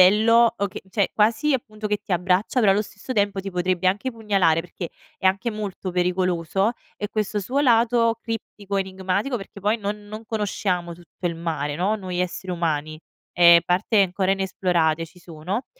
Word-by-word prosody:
bello 230 +5 +6
o 200 - 0
che - - -8
cioè 200 -2 +1
quasi, 230 +8 +2
appunto, 215 -3 -4
che 210 - +1
ti 190 - -4
abbraccia, 185 +7 +1
però 210 - +5
allo 200 +2 +3
stesso 205 +4 -8
tempo 200 -3 +1
ti 195 - -6
potrebbe 180 0 +1
anche 210 +7 -1
pugnalare 195 -8 +2
perché 175 0 -7 0.3
è 190 - 0
anche 195 +5 +1
molto 205 -3 -5
pericoloso, 180 +2 +1 0.3
e 205 - -4
questo 210 -1 -1
suo 255 +8 -2
lato 230 -2 +3
criptico, 205 -3 -5
enigmatico 190 +5 -1
perché 200 -1 -9
poi 205 +3 +1
non 205 -1 -5
non 215 +2 -8
conosciamo 190 -5 -2
tutto 175 +1 -8
il 170 - -1
mare, 160 -3 -3
no, 195 +6 0
noi 185 -3 -4
esseri 180 +1 -3
umani. 155 -3 -1 0.4
Ehm 170 -1 +8
parte 185 +4 +2
ancora 190 +1 0
inesplorate 180 -4 +1
ci 180 +2 -17
sono, 175 +7 -5
195 Hz, 175 wpm, -23 LUFS, 180-215 Hz, 0.4 s, Ehm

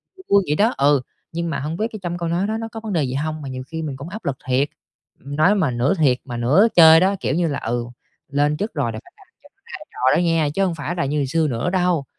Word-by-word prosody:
vui 375 - -15
vui 200 -1 +5
vậy 150 - +2
đó. 220 +7 +2
Ừ, 140 -1 +3 0.3
nhưng 170 0 -3
mà 140 - -2
hông 155 +4 -4
biết 220 - 0
cái 215 - -7
trong 175 0 -3
câu 170 -1 -3
nói 175 +4 0
đó 220 +1 -2
nó 225 0 -4
có 225 - -6
vấn 220 -3 -5
đề 160 -4 +1
gì 130 -1 -3
hông, 155 +2 -3
mà 140 - -6
nhiều 130 0 -6
khi 160 +2 -5
mình 145 -4 -4
cũng 145 +6 -8
áp 215 +3 -9
lực 135 -2 -2
thiệt. 130 +3 +1 0.5
Nói 155 +9 +1
mà 165 -10 +1
nửa 120 +8 +1
thiệt 140 -7 +3
mà 120 -3 -6
nửa 145 - +4
chơi 160 -1 +9
đó, 195 +2 +2
kiểu - - -1
như 175 0 +1
là 140 -3 -2
"Ừ, 120 +1 -2 0.4
lên 145 +2 +1
chức 210 +2 -3
rồi 140 -7 -1
là 110 - -6
phải - - -20
làm - - -20
sao - - -39
cho - - -17
ra - - -44 0.3
trò 130 +3 +2
đó - - +2
nha! 165 -3 +2
Chứ 195 - +2
hông 175 -3 -2
phải 150 +4 -4
là 170 - -1
như 145 +2 -1
ngày 140 - 0
xưa 160 +3 +1
nữa 125 +5 -1
đâu." 180 -5 +1
155 Hz, 300 wpm, -21 LUFS, 140-180 Hz, 0.5 s, chơi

